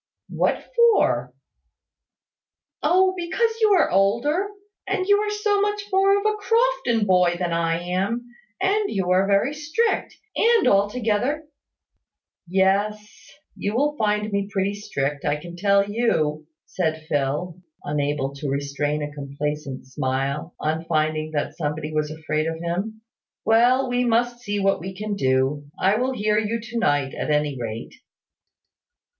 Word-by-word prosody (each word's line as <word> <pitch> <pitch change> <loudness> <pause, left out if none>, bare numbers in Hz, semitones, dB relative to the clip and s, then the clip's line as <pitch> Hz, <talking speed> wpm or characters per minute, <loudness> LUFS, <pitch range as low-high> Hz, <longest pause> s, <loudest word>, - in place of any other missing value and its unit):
"What - - 0
for?" 470 -2 +3 1.5
"Oh, 375 +1 +4
because 370 +6 0
you 430 -2 +5
are - - +2
older; 235 - +2 0.4
and 370 - 0
you 405 +1 +4
are 420 0 -1
so 415 -1 +1
much 415 0 0
more 390 +1 +4
of 405 - -3
a 430 0 +2
Crofton 455 - +1
boy 180 -2 +3
than 175 -1 -1
I 165 0 +1
am 195 +7 -1 0.3
and 395 +2 +1
you 190 -3 -1
are 190 +2 +3
very 200 +8 +2
strict 310 +10 -1 0.2
and 460 -3 +4
altogether 225 +8 +1 0.5
" - - -62 0.2
"Yes, 195 +3 +2 0.6
you 205 +2 -3
will 295 +4 +1
find 210 -3 0
me 200 0 -1
pretty 200 -1 0
strict, 145 -8 -3
I 145 0 +1
can 170 +3 -9
tell 200 +2 +3
you," 155 -9 0 0.2
said 160 -3 -2
Phil, 150 +4 -1 0.2
unable 145 -1 -1
to 140 0 -4
restrain 145 +2 -1
a 145 0 -5
complacent 145 -1 -4
smile 135 +5 -2
on 160 +1 -1
finding 155 -1 0
that 145 - -2
somebody 150 -1 -3
was 155 -1 0
afraid 155 0 -2
of 165 0 -3
him. 190 +6 -3 0.4
"Well, 245 +4 +4
we 245 0 +1
must 240 0 +1
see 205 -4 -3
what 195 0 +2
we 190 +3 -7
can 210 +2 -3
do. 135 -1 +1
I 195 +3 +3
will 255 +2 0
hear 210 -2 +1
you 220 +2 -1
to 235 +1 -5
night, 145 -9 +1
at - - -4
any 150 -1 +1
rate." 115 0 -5
195 Hz, 150 wpm, -23 LUFS, 155-245 Hz, 1.5 s, you